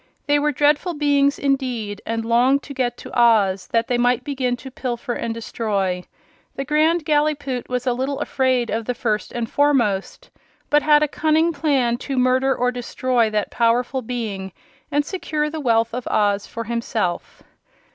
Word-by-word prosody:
They 290 0 +3
were 300 +1 +1
dreadful 295 +5 +1
beings, 285 -1 +2
indeed, 250 -7 -2
and 225 0 -2
longed 250 +4 +3
to 280 - -8
get 245 -2 -1
to - - -10
Oz 210 -6 +3
that 230 0 0
they 245 -1 0
might 245 0 +2
begin 260 -4 -1
to 260 +2 -10
pilfer 245 0 -4
and 230 - -3
destroy. 200 -5 -2 0.5
The 275 - -4
Grand 310 +3 +2
Gallipoot 295 -4 0
was 250 0 -2
a 250 - +2
little 265 +3 -2
afraid 255 -3 0
of 225 +1 -2
the 250 - -2
First 215 -3 -2
and 235 -1 -3
Foremost, 240 -9 0 0.4
but 295 0 +5
had 300 0 +5
a - - +2
cunning 315 +3 +1
plan 270 -6 +1
to 270 +1 -5
murder 255 +1 +2
or 250 0 +1
destroy 245 -1 0
that 210 -1 -2
powerful 240 +3 +1
being 215 -6 -5 0.4
and 290 0 +1
secure 305 -5 -2
the 320 - -4
wealth 230 -3 +2
of 250 0 -4
Oz 205 -1 +1
for 230 - -5
himself. 225 -5 -3
250 Hz, 170 wpm, -21 LUFS, 230-285 Hz, 0.5 s, but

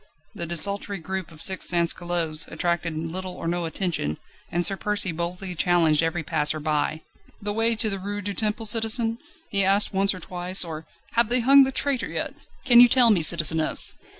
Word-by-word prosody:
The 170 - -6
desultory 200 +4 0
group 190 +1 -6
of 160 -1 -7
six 190 -1 +3
sansculottes 170 -2 +1
attracted 170 -2 -3
little 180 +3 -6
or 170 - -7
no 175 0 -2
attention, 160 - -3 0.3
and 175 +1 +3
Sir 195 - +4
Percy 205 -2 0
boldly 180 +3 -5
challenged 165 -3 +2
every 165 0 -3
passer 155 0 0
by. 155 +1 -2 0.4
"The 205 0 -4
way 225 +1 0
to 220 0 +2
the 195 -2 -3
Rue 205 +2 -6
du 205 +1 -5
Temple, 215 +2 -1
citizen?" 225 +1 +2 0.3
he 200 -1 +1
asked 200 +2 +1
once 195 0 +1
or - - -9
twice, 180 +1 -1
or: 160 -1 -9 0.2
"Have 235 -1 +1
they 245 +1 +1
hung 275 +3 +6
the 265 - -2
traitor 270 -1 -2
yet? - - -4 0.3
Can 240 -3 +6
you 245 - +8
tell 240 -2 +4
me, 190 -5 +2
citizeness?" 160 -1 +2
185 Hz, 185 wpm, -23 LUFS, 165-210 Hz, 0.4 s, you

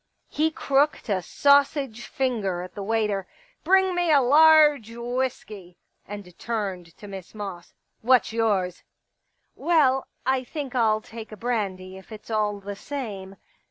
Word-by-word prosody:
He 310 +2 +1
crooked 280 -5 0
a 190 -2 +1
sausage 280 - +2
finger 210 -9 -2
at 180 - -10
the 205 - -7
waiter 210 -2 -1
— - - -29
*' - - -46
Bring 380 0 +4
me 350 -2 +1
a 290 - +6
large 295 -2 +6
whisky 235 -6 -5
" - - -51
— - - -40
and 200 -4 -9
turned 190 -7 -4
to 205 - -11
Miss 195 0 -9
Moss. 195 -5 -8
" - - -49
What's 250 -1 +3
yours? 200 -6 0 0.3
" - - -52
" - - -48
Well, 270 -6 +3 0.2
I 260 0 +1
think 275 0 -6
I'll 220 -3 +2
take 225 0 -10
a 215 - -9
brandy 190 -5 -3
if 190 - -15
it's 215 +1 -10
all 210 -2 0
the 200 0 -7
same." 200 -7 -6
225 Hz, 170 wpm, -25 LUFS, 195-270 Hz, 0.3 s, a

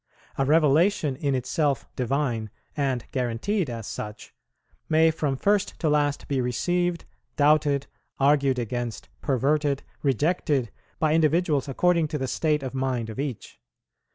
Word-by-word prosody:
A 135 - +1
revelation, 155 +1 +3
in 140 0 -1
itself 140 +3 0
divine, 125 -4 -1 0.3
and 135 -5 -1
guaranteed 130 - -1
as 115 -3 -5
such, 105 +1 -7 0.6
may 160 +1 +5
from 145 -4 -1
first 205 +5 +1
to 160 - +1
last 145 -1 +1
be 135 -2 0
received, 175 +8 0 0.3
doubted, 145 -1 +3 0.3
argued 140 -1 +3
against, 120 -2 -4
perverted, 140 +1 +1 0.2
rejected, 145 -2 +1 0.3
by 155 -2 +2
individuals 160 -2 +2
according 170 +4 +2
to 150 - -3
the 135 -2 -2
state 150 +2 0
of 130 -1 -4
mind 130 -4 -2
of 110 - -8
each. 135 - -5
140 Hz, 130 wpm, -25 LUFS, 130-155 Hz, 0.6 s, may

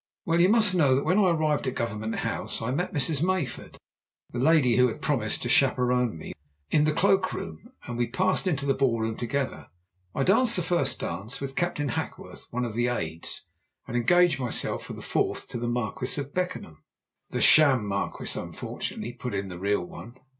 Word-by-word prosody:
Well, 170 +1 +2
you 180 - +5
must 215 -3 +5
know 145 -7 +4
that 135 - -1
when 185 +3 +3
I 190 -3 +4
arrived 155 -4 0
at 130 - -2
Government 110 -1 -3
House - - -3
I 115 +2 -3
met 175 +7 -2
Mrs. 150 -3 +2
Mayford 180 -8 -2 0.6
the 120 - -4
lady 135 -4 +4
who 125 0 +5
had 115 - -5
promised 120 -8 -1
to - - -2
chaperone 125 -4 +2
me 80 - -8 0.4
in 150 0 +3
the 155 - +2
cloak 190 +3 +2
room, 80 -1 -7 0.2
and 120 0 -5
we 120 - +1
passed 185 +9 +1
into 140 -6 -1
the 135 - +2
ball 130 -4 +1
room 110 0 -2
together. 130 +3 -3 0.5
I 135 - +1
danced 225 - +5
the 180 - 0
first 160 -7 +1
dance 100 +8 -3
with 135 -1 -6
Captain 175 -5 -1
Hackworth, - - -6
one 125 +1 -2
of 115 - -5
the 120 +2 0
aides, 80 -9 -3 0.4
and 120 - -6
engaged 175 +7 +3
myself 125 -2 0
for - - -8
the - - -9
fourth - - -1
to 120 - -5
the 120 - -3
Marquis 125 +2 0
of 140 0 -6
Beckenham." 180 - -4 0.5
"The - - -3
sham 140 -8 +6
Marquis, 100 0 -2
unfortunately," 120 - -6
put 125 -3 -5
in 95 0 -3
the 90 -1 -8
real 100 -1 0
one. 120 +6 -11
130 Hz, 195 wpm, -26 LUFS, 115-165 Hz, 0.6 s, sham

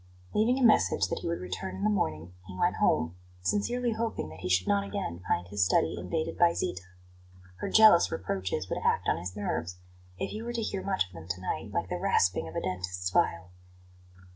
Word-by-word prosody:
Leaving 230 +5 +3
a 265 - 0
message 220 - +4
that - - -2
he - - -5
would 170 - -1
return 95 +1 -5
in 95 - -5
the 105 - +3
morning 80 -3 -2
he 90 -2 -8
went - - +1
home, 80 +2 +2 0.3
sincerely 240 - 0
hoping 225 - -2
that 80 - -11
he - - -4
should 90 0 +2
not 100 0 +2
again 95 -3 -4
find 90 +1 0
his 105 0 +1
study 90 -2 +2
invaded 125 - -3
by 170 -1 +5
Zita. 90 - -2 0.8
Her - - -4
jealous 215 -6 +7
reproaches 95 0 -2
would - - -2
act - - +1
on - - +2
his 90 +2 -6
nerves, 90 -3 -3 0.4
if - - -3
he 215 - -5
were 240 +1 -4
to 235 - -1
hear 195 -2 -2
much 190 - +1
of 90 - -19
them 80 -1 -10
to 90 0 -3
night, 95 - -3
like - - -2
the - - -2
rasping 90 -3 +2
of 80 - -9
a - - -1
dentist's 90 0 -3
file. 90 -1 +1
95 Hz, 215 wpm, -29 LUFS, -, 0.8 s, jealous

